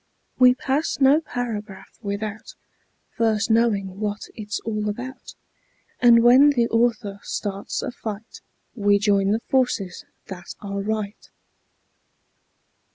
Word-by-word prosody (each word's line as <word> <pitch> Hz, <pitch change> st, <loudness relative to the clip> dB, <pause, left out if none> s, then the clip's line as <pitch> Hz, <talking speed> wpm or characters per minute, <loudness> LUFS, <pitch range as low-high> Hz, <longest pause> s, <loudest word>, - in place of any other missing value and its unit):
We 250 Hz, 0 st, +7 dB
pass 275 Hz, +4 st, -1 dB
no 280 Hz, +3 st, +5 dB
paragraph 220 Hz, -9 st, -6 dB
without 210 Hz, +1 st, -5 dB, 0.6 s
First 220 Hz, -2 st, 0 dB
knowing 200 Hz, -4 st, +1 dB
what 210 Hz, 0 st, -3 dB
it's 210 Hz, -1 st, -5 dB
all 210 Hz, -2 st, -2 dB
about, 245 Hz, +5 st, -7 dB, 0.6 s
And 235 Hz, -1 st, +6 dB
when 255 Hz, +4 st, +7 dB
the 240 Hz, -5 st, +2 dB
author 230 Hz, -3 st, 0 dB
starts 200 Hz, -1 st, -4 dB
a -, -, -3 dB
fight 220 Hz, -2 st, -8 dB, 0.3 s
We 205 Hz, -3 st, +3 dB
join 200 Hz, -1 st, +2 dB
the 220 Hz, +3 st, +1 dB
forces 245 Hz, -8 st, 0 dB, 0.2 s
that 180 Hz, -2 st, -9 dB
are 200 Hz, -1 st, -4 dB
right. 210 Hz, 0 st, -4 dB
215 Hz, 115 wpm, -23 LUFS, 200-240 Hz, 0.6 s, We